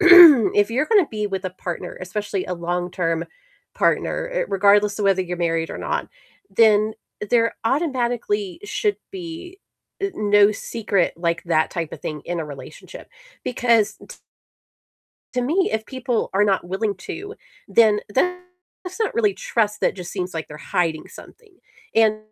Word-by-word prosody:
if 310 - +8
you're 265 +6 0
gonna 410 -8 +4
be 210 -1 -2
with 190 -1 -4
a 185 - -2
partner, 180 -1 -6
especially 195 +1 -3
a 180 - -3
long-term 175 -1 -2 0.5
partner, - - 0
uh, - - 0
regardless 205 +1 +3
of - - 0
whether 190 -1 +3
you're 180 0 -5
married 165 -1 -1
or - - -6
not, - - -3 0.4
then 215 -1 +4 0.4
there 230 -1 +2
automatically 240 - -1
should 415 0 -1
be, 355 0 -8 0.4
uh, 395 - +1
no 205 0 +4
secret 205 -5 -1
like 170 0 -1
that 160 -2 +1
type 165 -3 -4
of - - -8
thing 150 -2 -5
in 175 0 -3
a 160 - -2
relationship, 145 -2 -11 0.3
because 230 -4 +2
t - - -11 1.2
to 250 - 0
me, 335 +9 +1
if 220 0 -1
people 255 -3 -2
are 200 +2 +3
not 195 -3 +1
willing 195 +4 -2
to, 405 - -8 0.3
then 215 -2 +4 0.2
that's 360 - -4
not 440 - +1
really 210 -4 +2
trust, 210 -2 -1
that - - +1
just 180 -2 -7
seems 180 -2 -4
like 160 -1 -4
they're 150 - -10
hiding 165 -2 -2
something, 440 -5 -15 0.4
and 220 -1 +4
210 Hz, 155 wpm, -22 LUFS, 180-260 Hz, 1.2 s, if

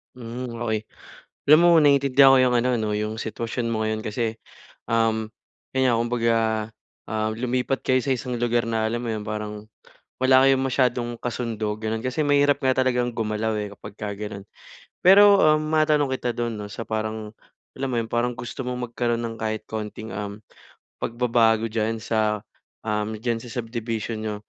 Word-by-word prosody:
Hmm, 125 +1 -6 0.2
okey. 110 -2 -1 0.6
Alam 150 +2 +8
mo 175 - +6
naintindihan 140 -2 +6
ko - - +6
'yung 125 -1 +3
ano 125 +1 +2
'no 110 -2 -1
'yung 105 +1 -2
sitwasyon 115 +2 -3
mo 110 -1 -1
ngayon 110 0 -2
kasi, 110 +1 -2 0.5
um, 110 -1 +1 0.5
kaya 130 -1 +3
kumbaga, 115 -1 +1 0.7
um, 110 0 -1
lumipat 125 +2 -1
kayo 130 0 +3
sa 130 +1 0
isang 125 -1 -4
lugar 120 0 +1
na 110 -1 0
alam 120 +2 -3
mo 115 - -3
'yun 105 -1 -4
parang 105 0 -5 0.5
wala 130 0 +6
kayong 135 -1 +4
masyadong 125 -2 +1
kasundo, 115 -3 -3
gano'n. 110 +1 -3
Kasi 130 +4 -1
mahirap 145 0 +3
nga 130 -1 +2
talagang 125 -2 +2
gumalaw 110 0 -1
eh 105 -1 -4
kapagka 105 +1 -7
gano'n. 105 -1 -6 0.6
Pero, 200 +2 +8
um, 155 0 +4
matanong 155 -2 +3
kita 125 -2 -2
dun 120 -2 -2
'no 105 - -6
sa 115 +3 -6
parang, 110 0 -4 0.4
alam 135 0 -2
mo 125 - -2
'yun 115 - -7
parang 120 +1 0
gusto 120 +2 -6
mong 125 -1 -4
magkaroon 120 -1 -1
ng 115 -1 -4
kahit 110 0 -3
konting, 110 0 -5
um, 100 +1 -6 0.6
pagbabago 115 -2 +2
diyan 110 0 -1
sa, 110 -2 0 0.4
um, 105 0 -1
diyan 115 0 -1
sa 120 - -10
subdivision 115 -1 -4
niyo. 105 -1 -2
115 Hz, 165 wpm, -24 LUFS, 110-125 Hz, 0.7 s, Alam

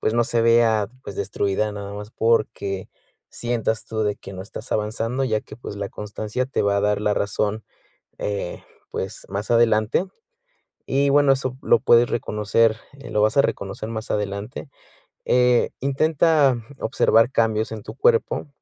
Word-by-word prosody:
pues, 110 - 0
no 120 0 +3
se 115 0 0
vea, 115 -3 +4 0.2
pues, - - -7
destruida 100 +1 -1
nada 100 -1 -6
más 105 +1 -8
porque 110 -5 0 0.4
sientas 115 -2 -2
tú 110 -1 -2
de 105 -1 0
que - - -11
no 95 0 -7
estás 110 +4 -8
avanzando, 115 +5 -1
ya 110 -4 0
que, - - -12
pues, 110 -4 -8
la 100 -1 -4
constancia 105 +5 -4
te 135 - -1
va 100 0 +2
a - - +1
dar 105 0 +1
la 105 0 +1
razón, 105 +1 -1 0.5
eh, 100 -3 -4 0.3
pues, - - -5
más 100 +2 -4
adelante. 115 - +3 0.8
Y, 140 +1 +2
bueno, 145 -1 +5
eso 130 -1 -2
lo 115 - +4
puedes 120 0 +5
reconocer, 110 0 +1 0.2
eh, - - -9
lo 105 - +1
vas 110 +5 +2
a 140 - +7
reconocer 100 +2 -3
más 110 -1 -6
adelante, 105 +6 -3 0.6
eh, 125 -1 +3
intenta 145 0 +3 0.2
observar 115 +2 +3
cambios 110 -2 +1
en 110 -2 -6
tu - - -9
cuerpo, 460 - +2
110 Hz, 165 wpm, -23 LUFS, 105-120 Hz, 0.8 s, a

